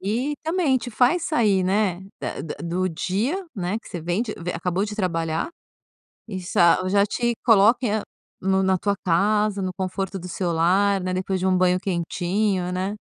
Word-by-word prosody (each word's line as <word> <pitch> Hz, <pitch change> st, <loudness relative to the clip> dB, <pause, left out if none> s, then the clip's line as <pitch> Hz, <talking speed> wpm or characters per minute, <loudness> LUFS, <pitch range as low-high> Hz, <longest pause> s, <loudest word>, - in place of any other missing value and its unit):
E 235 Hz, +9 st, -1 dB
também 320 Hz, -4 st, +1 dB
te 245 Hz, -, -7 dB
faz 255 Hz, +9 st, +2 dB
sair, 210 Hz, -, +2 dB
né, 190 Hz, -2 st, +1 dB, 0.2 s
da -, -, -4 dB
da 160 Hz, -, -5 dB
do 180 Hz, +2 st, -1 dB
dia, 210 Hz, -, -1 dB
né, 195 Hz, +1 st, -2 dB
que -, -, -15 dB
você 175 Hz, -, -5 dB
vem 175 Hz, +6 st, -1 dB
de 225 Hz, -3 st, -4 dB
eh, 175 Hz, -2 st, -5 dB
acabou 180 Hz, +2 st, -1 dB
de 210 Hz, 0 st, -5 dB
trabalhar 165 Hz, -5 st, -1 dB, 0.8 s
e 195 Hz, -5 st, -5 dB
sa 175 Hz, 0 st, +3 dB
e -, -, 0 dB
já 200 Hz, +1 st, +4 dB
te 235 Hz, +3 st, -1 dB
coloca 220 Hz, 0 st, +4 dB, 0.4 s
no 190 Hz, 0 st, +2 dB
na 190 Hz, -1 st, +2 dB
tua 200 Hz, +2 st, 0 dB
casa, 205 Hz, +3 st, +2 dB
no 185 Hz, -1 st, -2 dB
conforto 190 Hz, +1 st, -3 dB
do 180 Hz, 0 st, -8 dB
seu 175 Hz, 0 st, -2 dB
lar, 190 Hz, +4 st, +2 dB
né, 185 Hz, 0 st, -2 dB
depois 185 Hz, +1 st, -1 dB
de 185 Hz, -, -1 dB
um 185 Hz, -1 st, +3 dB
banho 180 Hz, 0 st, +3 dB
quentinho, 185 Hz, +1 st, -1 dB
né. 190 Hz, +3 st, -2 dB
190 Hz, 190 wpm, -23 LUFS, 180-215 Hz, 0.8 s, já